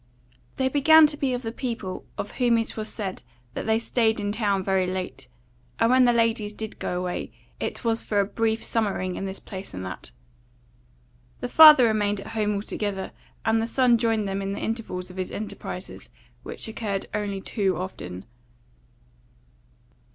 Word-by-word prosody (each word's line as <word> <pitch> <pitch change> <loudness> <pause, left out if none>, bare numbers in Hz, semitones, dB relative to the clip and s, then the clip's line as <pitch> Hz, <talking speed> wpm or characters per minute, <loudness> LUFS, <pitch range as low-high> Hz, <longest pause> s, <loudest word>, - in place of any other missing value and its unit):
They 260 - +1
began 305 +4 +7
to 295 0 +1
be 275 -3 -1
of 245 - -5
the 225 - -3
people 230 -7 -5
of 200 - -4
whom 240 -2 +3
it 225 - -2
was 215 -1 -4
said 195 -4 -5 0.3
that - - -5
they 220 0 +3
stayed 225 -1 +1
in 205 0 -1
town 205 -3 0
very 190 -1 +1
late; 185 -7 -5 0.5
and 230 +1 +3
when 255 0 +6
the 240 - +5
ladies 225 -3 +1
did 220 0 -6
go 180 - -2
away, 180 0 -4 0.3
it - - -4
was 225 0 +1
for 205 - 0
a 200 - +3
brief 225 +2 -1
summering 195 -5 -1
in 195 - -4
this 190 0 -5
place 190 - -9
and 95 0 -5
that. 95 -8 -7 1.3
The 125 - -4
father 305 -5 +9
remained 210 -2 +1
at - - -9
home 210 -2 0
altogether; 200 -1 -3 0.3
and 225 0 +3
the 225 - -1
son 245 -1 +4
joined 225 -3 +1
them 195 0 -2
in 195 0 -3
the - - -4
intervals 200 -5 -4
of 180 - -13
his 185 -1 -2
enterprises, 215 0 -7 0.3
which - - -6
occurred 210 -3 -3
only 205 -2 -2
too 195 -3 -1
often. 95 - -6
215 Hz, 175 wpm, -25 LUFS, 195-230 Hz, 1.3 s, father